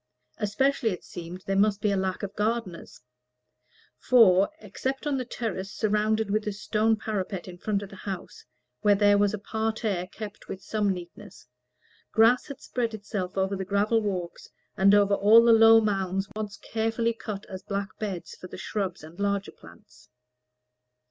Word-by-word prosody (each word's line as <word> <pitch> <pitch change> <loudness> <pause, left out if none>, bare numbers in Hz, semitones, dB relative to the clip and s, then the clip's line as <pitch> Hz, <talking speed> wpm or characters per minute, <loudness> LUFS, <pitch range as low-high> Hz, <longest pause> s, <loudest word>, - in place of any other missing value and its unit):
Especially, 235 +4 +1
it 180 - -5
seemed, 175 +2 -9
there 195 - -1
must 200 0 +3
be 210 0 +1
a - - +1
lack 190 0 -2
of 200 0 -5
gardeners; 210 -4 -3 1.0
for, 200 -6 +5
except 270 -2 -4
on 290 -2 0
the 255 - -3
terrace 210 -5 -4
surrounded 215 0 0
with 215 +1 0
a - - 0
stone 215 +2 +1
parapet 200 -4 -4
in 175 -1 -10
front 205 0 -1
of 200 - -9
the - - -10
house, 195 -1 -7 0.4
where 205 -1 +4
there 205 0 +4
was 205 -1 +3
a 215 - -3
parterre, 220 -3 -2
kept 210 +2 -9
with 190 - -6
some 210 -2 0
neatness, 180 +2 -9 0.7
grass 230 +3 +4
had 280 -2 -9
spread 230 -3 -2
itself 200 -3 -5
over 190 +1 +1
the 190 - -3
gravel 205 +4 +1
walks, 185 -5 -4 0.3
and 195 +1 +5
over 205 -1 +4
all 210 +4 +7
the 235 - +7
low 225 0 +8
mounds 195 -2 -1
once 210 -1 -5
carefully 225 +1 -1
cut 215 -3 -7
as 190 0 -8
black 200 -1 -4
beds 195 -5 -5
for 185 - -10
the - - -9
shrubs 190 -3 -3
and 160 +4 -13
larger 200 0 -1
plants. 85 +9 -18
205 Hz, 170 wpm, -27 LUFS, 190-220 Hz, 1.0 s, low